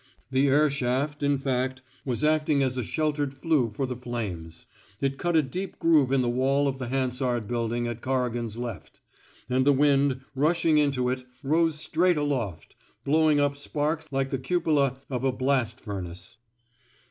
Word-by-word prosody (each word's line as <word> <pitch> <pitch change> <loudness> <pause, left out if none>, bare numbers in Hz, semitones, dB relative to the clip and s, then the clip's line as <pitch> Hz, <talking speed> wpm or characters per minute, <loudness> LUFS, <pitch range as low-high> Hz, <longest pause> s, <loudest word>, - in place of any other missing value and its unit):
The 135 +2 +3
air 145 +3 +4
shaft, 140 +3 -1
in 145 0 +2
fact, 130 -1 -2 0.2
was 130 +1 -2
acting 150 -2 +3
as 130 -1 0
a 125 - -2
sheltered 145 +1 -1
flue 135 -4 +1
for 135 - -1
the 125 -1 -4
flames. 100 -10 -5 0.3
It 135 0 -1
cut 175 -1 0
a 160 - +5
deep 180 +9 -5
groove 150 -6 +3
in 135 -1 +3
the - - 0
wall 135 +3 +2
of 135 -1 -2
the 130 - -4
Hansard 125 -3 -1
Building 120 0 -1
at 120 -1 -5
Corrigan^s 120 -4 -2
left; 120 -5 -7 0.5
and 130 +1 +2
the 145 - +5
wind, 140 -1 +3
rushing 155 +2 +3
into 140 -4 +1
it, 130 0 -3 0.2
rose 160 +3 +2
straight 170 +3 +1
aloft, 120 - -2 0.3
blowing 155 0 +3
up 145 0 +2
sparks 155 +2 -2
like 135 -1 -1
the 135 - -1
cupola 140 -2 +1
of 130 -2 -3
a 135 - +2
blast 130 -2 0
furnace. 90 -1 -7
135 Hz, 170 wpm, -26 LUFS, 125-145 Hz, 0.5 s, a